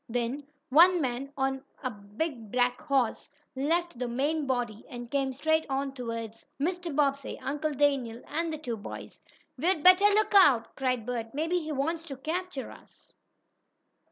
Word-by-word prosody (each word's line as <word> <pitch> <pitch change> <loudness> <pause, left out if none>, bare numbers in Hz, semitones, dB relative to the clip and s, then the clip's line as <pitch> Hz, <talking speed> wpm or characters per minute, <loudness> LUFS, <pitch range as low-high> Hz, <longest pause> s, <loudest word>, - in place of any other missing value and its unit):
Then 245 +4 -2 0.2
one 345 +6 +7
man, 265 -1 -2
on 270 0 -1 0.2
a 255 - -1
big 215 +3 -5
black 245 0 +1
horse, 275 -6 0 0.3
left 325 +1 0
the 250 - -1
main 285 +5 0
body 240 -4 -2
and 240 -1 -8
came 275 -1 +1
straight 315 +4 +1
on 270 0 -1
toward 230 -4 -5 0.3
Mr. 345 0 -2
Bobbsey, 280 -2 0
Uncle 295 +2 -2
Daniel, 260 -5 +1
and 330 +2 -2
the 310 - -3
two 245 -7 -4
boys. 205 - -9 0.4
"We'd 330 0 +1
better 370 +2 +8
look 420 +1 +3
out!" 280 - +6
cried 255 -4 -1
Bert 235 -1 -4
"Maybe 330 +4 +1
he 310 -2 -5
wants 315 +4 -1
to 275 -4 -7
capture 325 0 -4
us!" - - -16
275 Hz, 155 wpm, -29 LUFS, 245-315 Hz, 0.4 s, better